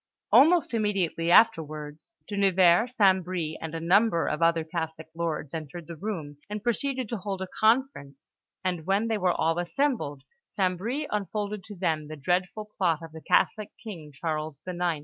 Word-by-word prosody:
Almost 330 -2 +5
immediately 195 -6 0
afterwards, 155 - +2
De 205 - -5
Nevers, 190 +4 +4
St. 190 -4 +4
Bris, 170 -3 -3
and 160 0 -5
a - - -2
number 175 +1 +3
of 150 - -2
other 165 -1 +3
Catholic 160 -1 -5
lords 165 -4 -3
entered 160 +1 -6
the 170 - -8
room, 160 -6 -5
and 210 0 -5
proceeded 255 +2 -1
to 235 - -2
hold 195 -1 -4
a 190 - -4
conference; 220 - 0 0.3
and 175 -3 -2
when 200 +4 +1
they 220 -2 0
were 180 -1 +2
all 165 0 +1
assembled, 175 - -1 0.2
St. 185 -2 0
Bris 240 +11 -3
unfolded 210 0 -3
to 210 -2 -9
them 160 -5 -1
the 155 - -7
dreadful 180 +8 -1
plot 165 -4 +1
of 165 - -9
the 160 0 -10
Catholic 215 +5 +2
King, 170 -10 -8
Charles 155 0 -4
IX. 175 -3 -1
180 Hz, 170 wpm, -27 LUFS, 160-210 Hz, 0.3 s, Almost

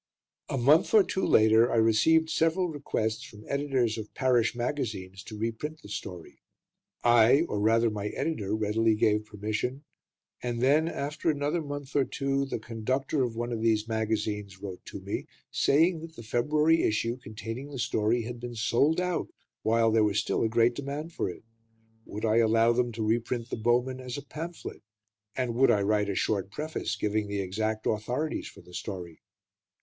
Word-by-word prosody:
A - - -1
month 145 - +4
or 210 - +8
two 190 - -2
later, 110 +2 +5
I - - +1
received 115 +9 +4
several 170 +3 +2
requests 115 -7 -2
from 105 0 -12
editors 135 -6 0
of 110 - -8
parish 120 -4 +2
magazines 110 -7 -3
to 110 - -8
reprint 115 +8 -4
the 100 - -11
story. 90 -4 -7 0.6
I 120 +4 +6
or, 135 -11 -2
rather, 115 +2 +3
my 105 -1 -3
editor 105 -5 -2
readily 110 +1 +2
gave 105 0 +2
permission; 110 +6 -3 0.6
and 120 -1 -3
then, 145 +6 +3
after 150 0 -2
another 150 +3 0
month 145 -2 -7
or 140 - +4
two, 140 0 -1
the 135 - -3
conductor 120 +6 -2
of 120 -3 -1
one 120 +1 -3
of 115 -2 -3
these 110 -1 +2
magazines 105 -3 -2
wrote 95 -2 -7
to - - -8
me, - - -4 0.2
saying 165 +4 +3
that 165 0 -10
the 115 - -9
February 150 +8 +2
issue 115 +3 0
containing 115 +3 -7
the 140 - -7
story 115 0 +1
had 120 +1 -6
been 120 0 -6
sold 140 +9 +2
out, 180 -1 -1 0.3
while 115 0 +3
there 110 0 +4
was 105 -1 +1
still 105 - 0
a 110 - +2
great 115 +1 +3
demand 145 +5 -5
for - - -1
it. 90 - -9 0.6
Would 105 +2 -5
I 110 0 +3
allow 115 0 +4
them 120 0 +1
to 110 -1 -2
reprint 115 +2 -1
"The - - -1
Bowmen" 120 +3 +1
as 125 0 -6
a 140 - -7
pamphlet, 165 +3 -7 0.6
and 125 -2 0
would 130 +3 +4
I 100 - +3
write 105 0 +1
a 100 - -1
short 100 -2 0
preface 155 +9 -3
giving 105 0 -1
the 100 0 -3
exact 110 +3 -2
authorities 125 +8 -1
for - - -13
the 90 - -17
story? 90 -5 -6
115 Hz, 180 wpm, -28 LUFS, 110-140 Hz, 0.6 s, or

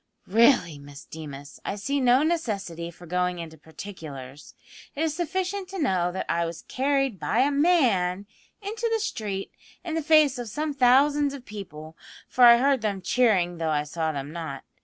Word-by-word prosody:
"Really, 205 - +3
Miss 140 0 -12
Deemas, 145 -3 -9
I - - -3
see 275 +8 -2
no 255 +2 +4
necessity 200 - -2
for 175 +1 -14
going 180 +1 -1
into 165 -2 -8
particulars. 150 -5 -10 0.4
It 300 - -1
is 315 -2 -1
sufficient 370 +3 -2
to 385 0 -6
know 185 - +1
that 190 - -4
I 170 0 0
was 165 -1 -5
carried 270 -5 0
by 235 - +1
a 280 +2 +3
man 240 - +2 0.4
into 445 +3 -2
the 450 - +1
street 205 - -4 0.3
in 340 -3 -4
the 325 - 0
face 300 -4 +4
of 240 -2 -5
some 300 +6 -3
thousands 280 +2 +3
of 260 -3 -11
people, 160 -7 -9 0.3
for 250 - +5
I 235 0 +9
heard 270 0 +2
them 200 -3 -2
cheering 180 -6 +2
though 165 -1 -1
I 150 -1 +1
saw 160 +1 -2
them 140 -1 -5
not. 160 -5 -6
210 Hz, 180 wpm, -26 LUFS, -, 0.4 s, I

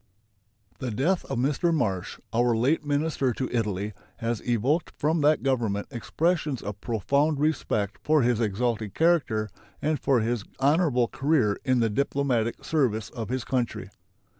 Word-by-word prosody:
The 130 - -3
death 145 - 0
of - - -3
Mr. 145 +7 +1
Marsh, 100 - -1
our 120 0 +3
late 140 +7 +2
minister 145 -3 0
to 130 +3 -2
Italy, 105 -2 -1 0.2
has 115 -1 -2
evoked 125 +8 0
from 155 +2 +1
that 150 +1 +3
Government 115 -7 0
expressions 150 +3 -1
of 105 -1 -6
profound 140 +7 +1
respect 115 -9 0
for 155 -3 +3
his 120 -1 +2
exalted 110 -1 -1
character 155 -11 +2 0.3
and 155 0 0
for 130 -4 +2
his 115 -1 -1 0.2
honorable 140 -3 +3
career 135 -8 +1
in 130 -2 +2
the 115 - +2
diplomatic 130 -2 0
service 115 -9 0
of 115 -3 -5
his 130 -1 -2
country. 125 -2 -2
125 Hz, 145 wpm, -26 LUFS, 115-150 Hz, 0.3 s, our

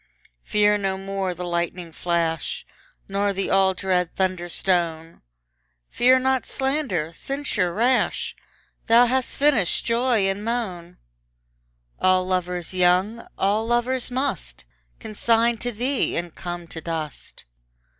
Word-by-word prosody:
Fear 210 0 +3
no 195 -1 -1
more 195 -1 -3
the 180 - -6
lightning 170 0 -3
flash, 165 -1 -2 0.4
Nor 200 +1 0
the 195 0 -2
all 190 -1 +4
dread 180 -3 -1
thunder 185 -2 -1
stone; 170 -3 -1 0.7
Fear 255 +2 +5
not 260 0 0
slander, 265 - -1
censure 270 -6 -2
rash; 240 +7 +1 0.5
Thou 235 +2 +7
hast 255 +1 -1
finished 275 -11 +2
joy 235 -3 +2
and 195 +2 -2
moan; 190 -7 -3 1.0
All 185 0 +3
lovers 180 -1 -2
young, 185 +5 +2
all 210 +3 +1
lovers 240 +2 0
must 60 - -3 0.3
Consign 230 +2 +1
to 245 +2 -3
thee, 250 +5 -1
and 170 -1 -3
come 175 -1 -6
to 165 - -7
dust. 160 - -6
195 Hz, 120 wpm, -23 LUFS, 175-235 Hz, 1.0 s, Thou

